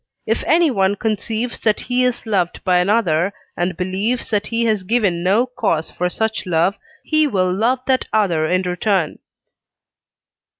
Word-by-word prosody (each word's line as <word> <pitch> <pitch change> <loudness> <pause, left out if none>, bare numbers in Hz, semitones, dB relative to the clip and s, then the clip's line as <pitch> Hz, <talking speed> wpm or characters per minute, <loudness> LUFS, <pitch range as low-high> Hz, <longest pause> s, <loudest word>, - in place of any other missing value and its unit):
If - - -1
anyone 240 - +3
conceives 220 +3 -2
that 215 -2 +1
he 250 0 0
is 250 -1 -1
loved 190 -6 -1
by 180 -2 +3
another, 180 -2 +1 0.2
and 175 0 -2
believes 195 +8 -2
that 210 -1 0
he 230 0 0
has 215 -3 +1
given 185 -4 0
no 200 +7 +3
cause 220 -11 -2
for 180 0 -1
such 220 +1 -2
love, 175 +3 +2 0.3
he 310 -1 +2
will 185 -7 +1
love 240 +6 +1
that 260 -1 +1
other 175 -8 +1
in 185 +3 +1
return. 180 -2 -1
205 Hz, 155 wpm, -19 LUFS, 180-230 Hz, 0.3 s, anyone